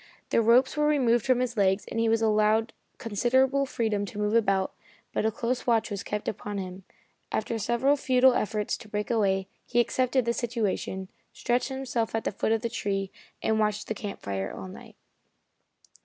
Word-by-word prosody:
The - - +4
ropes 240 +5 +4
were 300 0 +2
removed 250 -5 +2
from 255 -1 +3
his 250 -1 -2
legs, 195 -1 +2
and 230 - -3
he 230 0 +2
was 225 0 +2
allowed 215 +1 +2 0.2
considerable 260 +5 +2
freedom 220 -5 -1
to 205 - -9
move 210 0 0
about, 195 -4 +2 0.4
but 220 - +1
a - - +1
close 240 +3 -2
watch 230 -2 +2
was 200 -1 -3
kept 210 0 -4
upon 205 0 -4
him. 185 -1 -6 0.5
After 225 +1 -1
several 240 +6 +2
futile 260 -2 +4
efforts 210 -2 -1
to 220 -3 -13
break 210 +2 -2
away, 195 -4 +1 0.2
he 240 - 0
accepted 255 +1 +1
the 235 - +1
situation, 210 -5 -2 0.3
stretched 245 +2 0
himself 255 -4 -2
at 225 - -1
the - - -1
foot 205 - -1
of 225 -1 +1
the - - +1
tree 195 -4 -2 0.3
and 220 0 +2
watched 210 -1 0
the - - -2
camp 205 -2 -7
fire 95 -1 -3
all 95 - -7
night. 95 - -12
225 Hz, 185 wpm, -27 LUFS, 205-240 Hz, 0.5 s, The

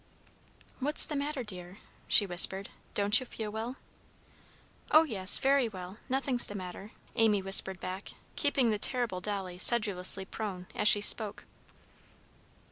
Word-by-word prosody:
"What's 290 +3 +4
the 300 - -6
matter, 285 -1 -3
dear?" 180 -3 -9 0.3
she 205 - +5
whispered. 190 +2 +2 0.3
"Don't 205 +3 +3
you 255 - -8
feel 215 -2 -6
well?" 225 +4 -6 1.1
"Oh, 310 +1 +6
yes! 200 -10 +3
very 270 -3 +1
well. 185 0 -10
Nothing's 265 -1 -1
the 205 - -8
matter." 190 +2 -9 0.2
Amy 220 -3 +2
whispered 190 -1 +4
back, 185 +3 -7 0.2
keeping 275 -5 +1
the 210 - -2
terrible 235 -6 -2
Dolly 190 -3 -5
sedulously 195 -4 +3
prone, 190 -3 -7
as 210 - -1
she 205 - +6
spoke. 210 0 -1
210 Hz, 135 wpm, -29 LUFS, 190-245 Hz, 1.1 s, Oh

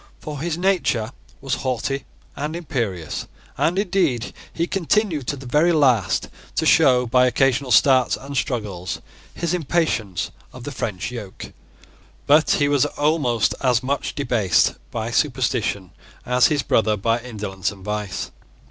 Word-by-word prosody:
For 150 -2 -6
his 165 0 -2
nature 175 - +1 0.3
was 135 -1 -3
haughty 135 +2 -2 0.3
and 150 +3 -3
imperious; 115 - -3 0.3
and, 175 +3 +1
indeed, 175 - 0 0.2
he 170 - -1
continued 175 - 0
to 145 - -1
the 135 -1 -10
very 150 +7 +3
last 130 - +2 0.3
to - - 0
show, 130 -6 +5
by 125 +1 +4
occasional 135 +1 +1
starts 130 -1 +4
and 140 +1 -8
struggles, 105 -9 -2 0.4
his 170 0 -2
impatience 155 - -1 0.2
of - - -10
the - - -5
French 100 +3 -4
yoke. 105 -6 -8 0.7
But 150 +2 +5
he 145 - +3
was 145 0 +3
almost 145 -7 +1
as 125 -2 +2
much 140 +2 -2
debased 120 - +2 0.2
by 115 +1 -4
superstition 120 - 0 0.3
as 125 -1 +4
his 145 0 0
brother 110 -1 +2
by 115 +3 +1
indolence 105 -6 -4
and 95 -2 -13
vice. 105 -2 -3
130 Hz, 140 wpm, -22 LUFS, 115-150 Hz, 0.7 s, show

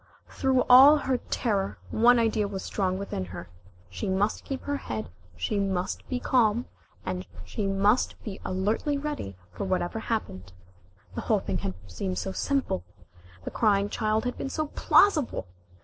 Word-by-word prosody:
Through 265 -2 +2
all 270 +4 +9
her 265 -3 0
terror 200 -5 0
one 240 +2 +5
idea 220 -2 +2
was 195 -1 -5
strong 185 -2 -1
within 195 - -4
her. 90 -1 -9 0.4
She 210 - -4
must 195 +3 0
keep 270 -1 -5
her 285 0 -1
head, 110 - -5 0.3
she 200 - -1
must 190 -2 -2
be 255 - -1
calm, 240 -2 +2 0.8
she 205 -3 -3
must 200 +4 +2
be 200 -4 -6
alertly 210 +10 0
ready 280 - -4
for 90 - -4
whatever 185 +2 -1
happened. 95 - -4 0.6
The - - -4
whole - - +2
thing - - -2
had 95 -1 -4
seemed 90 0 -4
so 90 - -2
simple. 260 - -1 0.6
The - - -5
crying 205 -2 +2
child 215 +2 0
had 250 - -3
been 270 - -3
so 310 +1 -2
plausible! 310 - +3
210 Hz, 155 wpm, -27 LUFS, 185-250 Hz, 0.8 s, all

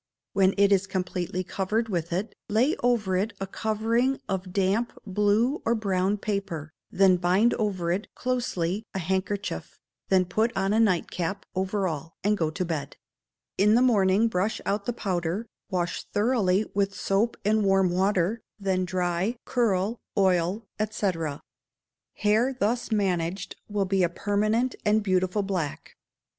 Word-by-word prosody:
When 195 -1 +3
it 200 0 +4
is 195 -1 +3
completely 185 -1 -2
covered 205 +5 -1
with 175 -4 -2
it, 190 +6 -2 0.2
lay 235 +8 +3
over 230 -6 +1
it 210 +4 -1
a 195 - -2
covering 225 +6 0
of 190 -2 -3
damp 200 +5 +1
blue 210 +7 +2
or 235 - +2
brown 195 -2 0
paper, 195 -7 -3 0.2
then 190 -1 +4
bind 185 +7 +3
over 190 -6 -1
it, 195 +5 -1
closely, 215 -7 -1
a - - 0
hankerchief, 190 - -2 0.3
then 185 -1 +4
put 220 +5 0
on 195 +1 +1
a 220 - +3
night 190 -7 +2
cap, 185 +3 -3
over 190 +1 0
all, 160 0 -5
and 210 +2 +3
go 160 -6 0
to 180 +4 -3
bed; 160 -4 -4 0.6
in 210 +2 +5
the 240 - +5
morning 210 -3 +4
brush 205 0 -1
out 200 0 -1
the - - +2
powder, 185 -1 -2 0.2
wash 175 -3 -2
thoroughly 205 -3 +2
with 200 0 0
soap 210 +4 0
and 215 +1 +3
warm 195 -2 +3
water, 190 +3 +1 0.2
then 190 -2 0
dry, 180 +4 -1
curl, 220 -2 +1 0.2
oil, 190 +2 +2 0.2
&c. 210 -2 0 1.0
Hair 225 +5 +2
thus 230 +4 0
managed 185 -3 -1
will 205 -1 0
be 190 0 +1
a 175 - +3
permanent 215 +7 0
and 215 +1 +3
beautiful 185 +1 +1
black. 180 -7 -4
195 Hz, 150 wpm, -26 LUFS, 185-215 Hz, 1.0 s, in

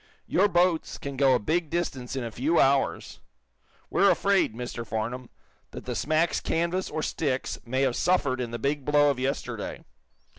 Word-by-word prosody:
Your 205 - +3
boats 175 -3 +1
can 140 -1 -6
go 135 -1 +4
a - - +1
big 160 +8 -1
distance 135 -8 -3
in 130 - -2
a 115 - -5
few 145 +9 +1
hours. 135 0 +1 0.7
We're 200 - +4
afraid, 195 - +2
Mr. 120 -1 -5
Farnum, 115 +3 -4 0.4
that - - -9
the - - -3
smack's 155 +3 +1
canvas 170 +3 -1
or 155 - -3
sticks 135 -5 -2
may 130 +3 0
have 130 -3 +1
suffered 145 -8 +1
in 120 - -3
the 120 - -4
big 140 +4 -1
blow 145 +1 +4
of 130 - -4
yesterday. 135 +2 -3
140 Hz, 175 wpm, -27 LUFS, 125-165 Hz, 0.7 s, go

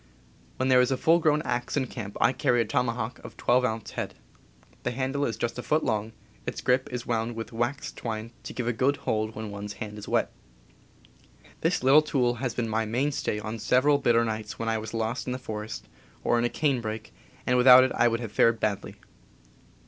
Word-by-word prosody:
^When 130 +1 +1
there 125 -1 +6
is 125 - +2
a 135 - 0
full 165 +5 +4
grown 155 -1 +2
axe 120 +1 -2
in 135 - +1
camp 110 -5 -7
I 130 - +4
carry 125 -4 +2
a - - 0
tomahawk 115 +1 -1
of - - -11
12 125 +1 +3
ounce 110 -3 -2
head. - - -4 0.7
The - - -1
handle 135 +3 -1
is 115 - -2
just 120 +1 -2
a - - -2
foot 155 +5 +1
long. 110 +1 -1 0.3
Its - - -3
grip 130 +1 +1
is 125 -1 -4
wound 115 0 -1
with 115 +1 -6
waxed 120 +5 -2
twine 110 -1 -4
to - - -7
give 125 -2 -3
a 120 - +1
good 135 +5 +1
hold 110 0 -1
when 110 -1 -5
one's 100 0 -6
hand 105 0 -7
is 105 - -9
wet. - - +1 1.3
This - - 0
little 135 +4 +7
tool 130 -5 +1
has 125 -3 -2
been 120 -2 -1
my 110 +1 0
mainstay 120 0 -1
on 110 +2 -5
several 140 +6 +3
bitter 115 -3 +3
nights 110 -1 -4
when 115 - -2
I 110 0 0
was 110 +1 -6
lost 115 +3 -2
in 125 - -1
the - - -3
forest, 110 -3 -6 0.4
or 120 - +2
in 120 - +1
a - - +1
canebrake, 115 -8 -2 0.3
and 125 - +2
without 125 +1 +9
it 130 - +1
I 120 - +4
would 115 0 0
have 115 -3 -5
fared 115 +1 +3
badly. 105 -3 -2
120 Hz, 215 wpm, -27 LUFS, 110-130 Hz, 1.3 s, without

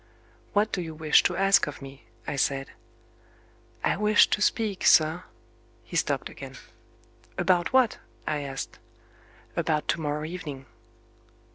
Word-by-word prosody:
"What 210 +1 +2
do 180 - -1
you 160 -2 -6
wish 155 -1 +4
to 180 - 0
ask 195 -3 +4
of 145 - -7
me?" 135 0 -12 0.2
I - - -3
said. 135 0 -1 1.1
"I - - +1
wished 210 +1 +4
to 205 - 0
speak, 210 -3 0
sir 160 +3 +4 0.3
" 115 0 -33
He - - -5
stopped 140 -4 0
again. 135 -1 -10 0.8
"About 175 -2 +2
what?" 255 -3 +3 0.3
I 150 -1 -1
asked. 135 -2 -6 0.8
"About 150 -1 0
to 165 - +1
morrow 150 0 -2
evening." 155 -6 -7
155 Hz, 140 wpm, -27 LUFS, 140-185 Hz, 1.1 s, wish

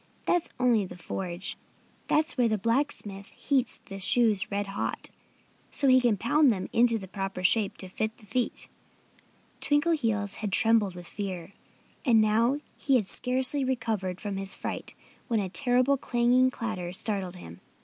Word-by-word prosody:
"That's 350 -2 +1
only 240 -4 +3
the 180 -1 -8
forge. 180 0 -4 0.5
That's 310 +1 +1
where 245 -3 +3
the 215 -1 +1
blacksmith 210 -4 -1
heats 270 -3 -1
the 195 0 -8
shoes 215 0 +4
red 205 0 -1
hot, 195 0 -3 0.6
so 280 - +2
he 255 0 +6
can 235 -4 +2
pound 280 +8 +3
them 195 -5 -1
into 230 0 +4
the 195 -3 -8
proper 195 -1 -4
shape 205 +2 +3
to 190 - -5
fit 220 +4 -3
the 220 - -18
feet." 235 +4 -2 0.9
Twinkleheels 275 -8 +1
had 210 -2 -3
trembled 220 -3 +3
with 175 0 -9
fear. 190 -1 -6 0.5
And 235 -6 +5
now 230 +6 +2 0.2
he 275 - +2
had 215 -6 +1
scarcely 260 +3 -1
recovered 225 -8 -2
from 205 -2 -4
his 195 0 -3
fright - - -6 0.3
when 230 -2 +1
a 195 -2 -2
terrible 255 +5 +2
clanging 245 +1 +3
clatter 220 -8 -4
startled 190 -2 -2
him. 85 - -11
220 Hz, 160 wpm, -28 LUFS, 195-250 Hz, 0.9 s, he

